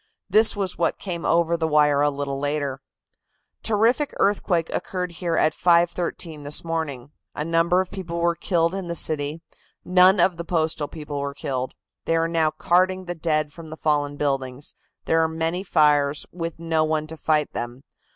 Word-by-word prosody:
This 220 +1 +5
was 195 -3 -3
what - - +1
came 175 -4 -5
over 170 0 +3
the 165 -1 -1
wire 150 -2 +3
a 145 - +4
little 140 -1 -4
later: 145 -2 -2 0.8
"Terrific 230 +7 +1
earthquake 180 -4 +1
occurred 180 -1 -3
here 170 0 -2
at 155 - +3
5.13 170 -2 +1
this 145 +1 +1
morning. 145 -5 -4 0.2
A 150 - -3
number 165 +2 +2
of 185 - -6
people 175 -4 -5
were 170 0 +2
killed 170 0 0
in 190 -2 -4
the 170 - -3
city. 155 0 -1 0.4
None 185 +1 +5
of 175 0 +3
the 170 - -4
Postal 160 -3 -1
people 150 -2 -6
were 140 0 -4
killed. 130 -2 -4 0.3
They 165 - +1
are 165 0 +2
now 165 -2 +2
carting 185 +4 +1
the 175 - -3
dead 155 -3 -1
from 165 -1 -10
the 155 0 -8
fallen 145 -2 0
buildings. 135 -1 -2 0.3
There 165 0 +3
are 160 - +3
many 165 +3 -2
fires, 150 -4 +3
with 165 -2 -5
no 165 -1 0
one 155 0 0
to 160 +1 -8
fight 155 -1 0
them. 120 +3 -5
165 Hz, 180 wpm, -23 LUFS, 150-175 Hz, 0.8 s, This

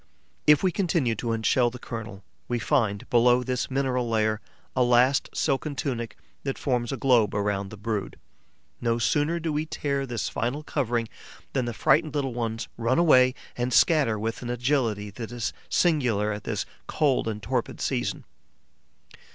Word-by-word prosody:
If 150 +2 +6
we 185 - +3
continue 165 - +1
to 115 +2 -3
unshell 115 +2 +2
the 125 - -8
kernel, 110 -5 -7 0.2
we 120 - 0
find, 115 -3 0
below 120 +1 +5
this 125 -1 -2
mineral 130 -3 0
layer, 110 -1 +1 0.3
a 130 - +2
last 125 +2 +4
silken 145 0 -1
tunic 120 -5 -3 0.2
that 135 -1 -3
forms 120 -4 -1
a 135 - -2
globe 120 -8 +3
around 100 -1 -1
the 105 - -10
brood. 100 -1 -3 0.6
No 115 -1 +1
sooner 150 +8 +1
do 160 -1 -2
we 150 +2 -1
tear 140 -3 -2
this 120 -3 -2
final 130 +6 -2
covering 120 -6 -1 0.5
than 130 -2 0
the 120 - -2
frightened 155 +5 +2
little 135 -3 -1
ones 115 -2 -3
run 120 +2 +1
away 130 -6 +5 0.2
and 125 +1 -1
scatter 140 -5 +4
with 115 +2 -3
an 120 - -5
agility 120 -5 0
that 115 +3 -7
is 120 -1 -3 0.2
singular 125 - +2
at 105 0 -6
this 105 -3 -2 0.2
cold 140 -6 +1
and 105 -2 -4
torpid 125 +3 -2
season. - - -2
120 Hz, 165 wpm, -26 LUFS, 115-135 Hz, 0.6 s, If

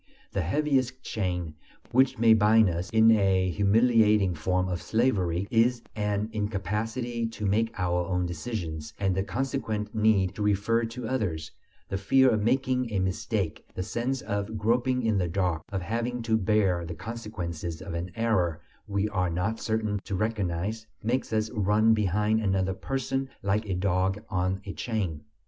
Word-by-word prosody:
The 100 - -1
heaviest 130 - 0
chain, 90 -6 -2 0.4
which 130 +1 +3
may 115 0 +6
bind 110 -2 +5
us 85 +2 -3
in 110 0 +6
a 95 -4 +3
humiliating 105 -1 +4
form 90 +3 0
of 90 -3 -3
slavery, 100 -6 +1
is 120 +1 +3
an 105 -1 -1
incapacity 110 +4 -2
to 110 -2 -5
make 110 +3 +2
our 90 -1 0
own 90 -1 0
decisions, 80 -4 -5
and 95 -2 +1
the 95 - 0
consequent 110 -2 -2
need 105 -4 +3
to 105 - -7
refer 105 +3 +2
to 115 +1 -6
others; 95 -12 -2 0.4
the 95 - -3
fear 130 +5 +4
of 110 -2 +1
making 125 +1 +1
"a 105 - -1
mistake," 95 -1 -1
the 90 - -2
sense 120 +6 -2
of 105 0 -3
groping 125 +4 +1
in 110 -3 +2
the 90 - 0
dark, 90 -2 0
of 95 -2 -2
having 120 +4 -2
to 115 -1 +2
bear 95 -4 +2
the 85 0 -6
consequences 90 -6 -5
of 95 -2 -7
an 85 +2 -3
error 100 -8 +1 0.3
we 100 +1 0
are 95 -4 0
not 90 +7 -1
certain 110 -2 -1
to 100 - -3
recognize, 105 +1 -2 0.2
makes 125 +4 -1
us 110 0 0
run 105 +1 +3
behind 105 +1 +1
another 95 -2 +1
person 135 +6 -2
like 105 +2 0
a 95 - 0
dog 95 +2 0
on 95 -1 -1
a 100 - -5
chain. 90 -5 -3
105 Hz, 160 wpm, -27 LUFS, 95-115 Hz, 0.4 s, may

